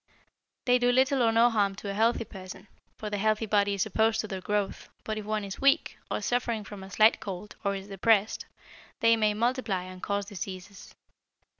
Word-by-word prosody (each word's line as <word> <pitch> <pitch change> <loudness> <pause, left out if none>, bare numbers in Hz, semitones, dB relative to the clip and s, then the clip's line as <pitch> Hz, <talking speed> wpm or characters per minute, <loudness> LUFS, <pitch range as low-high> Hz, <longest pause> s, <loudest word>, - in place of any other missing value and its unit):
They 250 0 +4
do 245 0 +3
little 260 +2 +3
or 230 -1 +4
no 230 +2 +5
harm 200 -3 +1
to 200 +1 -5
a - - -4
healthy 225 +3 +2
person, 190 -1 -10 0.3
for 210 -1 -6
the 205 - -2
healthy 215 +1 +1
body 205 -1 +2
is 195 - 0
opposed 220 +1 +1
to 215 - -6
their 190 -2 -5
growth, 205 0 -2
but 215 0 -3
if 210 - -8
one 215 0 -1
is 195 -1 -7
weak, 275 +3 +3
or - - -2
suffering 240 -3 -1
from 200 0 -9
a 190 - -9
slight 215 +3 +4
cold, 205 -1 -7
or 200 -1 0
is 195 0 -7
depressed, 205 +2 +2 0.5
they 230 0 +6
may 215 -2 +1
multiply 230 -5 0
and 185 0 -10
cause 200 0 -1
diseases. 195 0 -8
210 Hz, 200 wpm, -28 LUFS, 200-225 Hz, 0.5 s, they